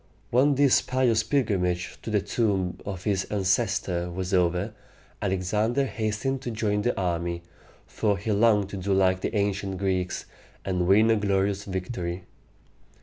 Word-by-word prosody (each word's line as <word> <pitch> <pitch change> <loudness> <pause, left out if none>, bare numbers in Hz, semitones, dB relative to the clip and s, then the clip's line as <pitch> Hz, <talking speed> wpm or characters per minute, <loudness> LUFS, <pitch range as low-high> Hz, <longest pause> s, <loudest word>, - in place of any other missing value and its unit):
When 135 +4 +4
this 140 -1 +4
pious 125 -4 +2
pilgrimage 100 -8 0
to - - -6
the 105 -2 +2
tomb 100 -4 -1
of 95 -3 -5
his 100 -3 0
ancestor 95 -3 0
was 90 +2 -4
over, 90 +3 +1 0.5
Alexander 105 +7 0
hastened 115 +3 -2
to 125 - -4
join 105 -2 0
the 120 +1 0
army, 85 -1 -2 0.4
for 105 -3 0
he 110 - -3
longed 105 -2 +3
to 100 - -6
do 95 +1 0
like 95 -1 +3
the - - -2
ancient 100 -1 -1
Greeks, 95 -2 -1 0.4
and 90 -2 0
win 110 +4 +5
a 110 - +3
glorious 100 0 0
victory. 90 -2 -4
100 Hz, 145 wpm, -26 LUFS, 95-110 Hz, 0.5 s, win